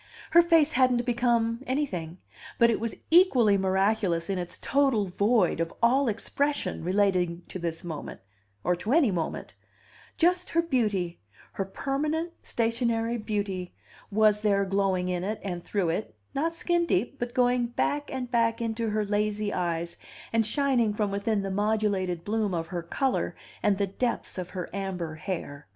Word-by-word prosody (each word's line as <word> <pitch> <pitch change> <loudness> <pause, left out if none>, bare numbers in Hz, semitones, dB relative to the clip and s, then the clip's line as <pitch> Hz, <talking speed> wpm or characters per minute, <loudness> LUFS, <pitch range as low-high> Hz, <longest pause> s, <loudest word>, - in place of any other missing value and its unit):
Her 340 - +8
face 330 -3 +4
hadn't 250 -2 +3
become 235 -1 +1
anything; 185 - -2 0.4
but 235 0 +5
it 225 - 0
was 230 0 -3 0.2
equally 265 - +6
miraculous 190 -2 +1
in 190 - -1
its 175 0 -4
total 270 -7 +2
void 200 0 +2
of 165 0 -1
all 260 +4 +3
expression 280 - -1
relating 180 -2 +1
to 185 - -5
this 165 0 -3
moment, 160 -4 -6 0.4
or 180 +1 +2
to 215 +8 -1
any 295 -9 +4
moment; 170 -3 -3 0.6
just 360 +2 +2
her 335 0 +2
beauty, 210 - 0 0.3
her 195 - -3
permanent 300 - -2
stationary 230 0 0
beauty, 200 -4 -3 0.3
was 210 0 +4
there 200 -2 +2
glowing 190 -2 +1
in 180 -1 -1
it 210 +3 -2
and 175 -3 -4
through 195 -5 0
it, 170 - -3 0.2
not 330 +4 -1
skin 345 0 +1
deep, 245 - 0
but 240 0 -4
going 245 -1 +3
back 290 +4 -1
and 255 -2 -4
back 230 -1 +2
into 230 -1 -2
her 215 0 0
lazy 210 0 -1
eyes, 170 -1 -2 0.4
and 225 -1 +3
shining 245 -5 +1
from 210 -2 0
within 200 +1 0
the 195 - -3
modulated 200 -4 0
bloom 210 -3 0
of 165 -1 -2
her 175 -2 -3
color 260 +10 -1 0.3
and 205 -2 +2
the 200 - +1
depths 215 0 -2
of 180 -1 -5
her 180 -1 -5
amber 185 -5 -3
hair. 155 - -5
210 Hz, 160 wpm, -27 LUFS, 185-245 Hz, 0.6 s, Her